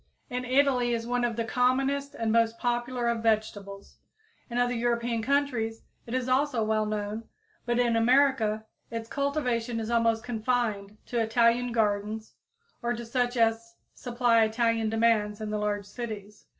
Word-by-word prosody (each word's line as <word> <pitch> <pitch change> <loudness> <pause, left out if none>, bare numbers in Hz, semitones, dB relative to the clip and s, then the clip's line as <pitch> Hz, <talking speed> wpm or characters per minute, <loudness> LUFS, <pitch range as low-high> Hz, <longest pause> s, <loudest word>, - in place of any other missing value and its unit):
In 250 0 -3
Italy 255 -2 +2
it - - +3
is 230 0 -4
one 245 +1 0
of 235 -1 0
the 230 0 -2
commonest 270 +4 +1
and 225 -1 -1
most 230 0 +2
popular 240 0 -1
of 235 -1 0
vegetables. 210 -3 -2 0.5
In 240 - -4
other 245 0 +2
European 235 -1 0
countries 245 -4 0 0.2
it 235 - -3
is 255 -1 -1
also 260 -2 +1
well 215 0 +1
known, 210 +1 -3 0.4
but 240 0 +1
in 240 -2 +2
America 230 -3 +3 0.2
its 230 0 -5
cultivation 250 -4 -1
is 225 +1 -4
almost 230 -1 +2
confined 220 -4 -1
to 240 - -2
Italian 235 +2 +2
gardens 215 -1 -1 0.5
or 240 0 -1
to 235 +1 -7
such 245 +1 -1
as 230 0 +1 0.2
supply 240 -2 +2
Italian 225 0 +1
demands 220 -2 +2
in 215 -1 -4
the 210 - -1
large 205 -1 -1
cities. 210 -1 -8
230 Hz, 160 wpm, -28 LUFS, 220-245 Hz, 0.5 s, it